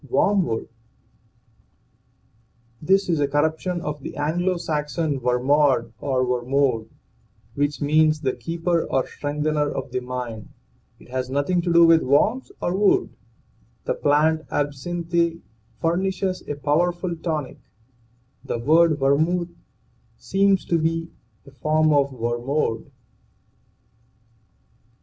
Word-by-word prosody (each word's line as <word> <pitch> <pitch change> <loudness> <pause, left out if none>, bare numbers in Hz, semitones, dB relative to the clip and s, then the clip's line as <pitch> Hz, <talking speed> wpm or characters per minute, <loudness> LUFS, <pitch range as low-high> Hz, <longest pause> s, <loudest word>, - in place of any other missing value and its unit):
WORMWOOD. 170 - +1 2.1
This 195 +4 +2
is 165 -4 +1
a 145 - +2
corruption 160 +5 -1
of 150 -2 -5
the - - -8
Anglo 175 +5 0
Saxon 150 -2 -2
wermod 125 -1 +2
or 130 -2 0
wermode, 125 -2 0 0.6
which 145 +1 -1
means 155 +1 +3
the 130 -3 0
keeper 170 0 -1
or 130 - 0
strengthener 150 0 -2
of 130 -2 -5
the 130 - -1
mind. 125 -3 -6 0.5
It - - -18
has 130 0 -3
nothing 145 +7 0
to 175 0 -1
do 170 0 +7
with 165 -1 +6
worms 220 - +1
or 175 - -1
wood. 200 0 +2 0.7
The - - 0
plant 155 +2 +2
(absinthe) 170 +4 -1 0.4
furnishes 185 +2 -1
a 145 - -3
powerful 170 +5 0
tonic. 160 -4 -4 0.8
The - - -3
word 155 +5 +4
vermuth 160 +6 +1 0.6
seems 195 0 +1
to 170 - +1
be 165 +1 -1 0.3
a 140 - -14
form 155 +4 +1
of 140 -1 +2
wermod. 120 0 -2
150 Hz, 115 wpm, -23 LUFS, 135-170 Hz, 2.1 s, do